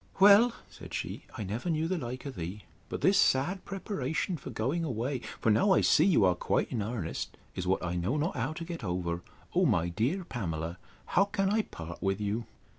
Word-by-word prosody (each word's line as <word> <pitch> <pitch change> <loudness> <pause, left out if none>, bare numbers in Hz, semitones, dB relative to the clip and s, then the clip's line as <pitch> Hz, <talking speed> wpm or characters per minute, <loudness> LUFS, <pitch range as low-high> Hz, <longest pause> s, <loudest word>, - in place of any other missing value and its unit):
Well, 205 +5 +8 0.2
said - - -9
she, - - -4
I - - -3
never 110 - -3
knew 160 0 +1
the 185 - 0
like 125 +1 -5
of 140 - -4
thee. 90 +5 -5 0.3
But - - -4
this 195 +1 +5
sad 175 +9 +3
preparation 185 - -2
for 135 - -8
going 130 +8 -1
away 130 -1 -1 0.2
(for 110 - +3
now 190 - +4
I - - +4
see - - +5
you 155 - +5
are 90 - +5
quite 90 - 0
in 115 - -1
earnest) 105 -6 -4 0.2
is 90 - -4
what 95 -1 +1
I 90 0 -1
know 95 - 0
not 155 +4 0
how 130 +4 -1
to 165 +1 -6
get 170 -6 -6
over. 90 -2 -2 0.3
O - - +4
my 85 +1 +2
dear 125 - 0
Pamela, 85 - -4 0.3
how 195 - +3
can 195 -1 0
I 220 +1 +3
part 85 - -9
with 95 0 0
you! 105 +2 -2
125 Hz, 210 wpm, -30 LUFS, -, 0.3 s, Well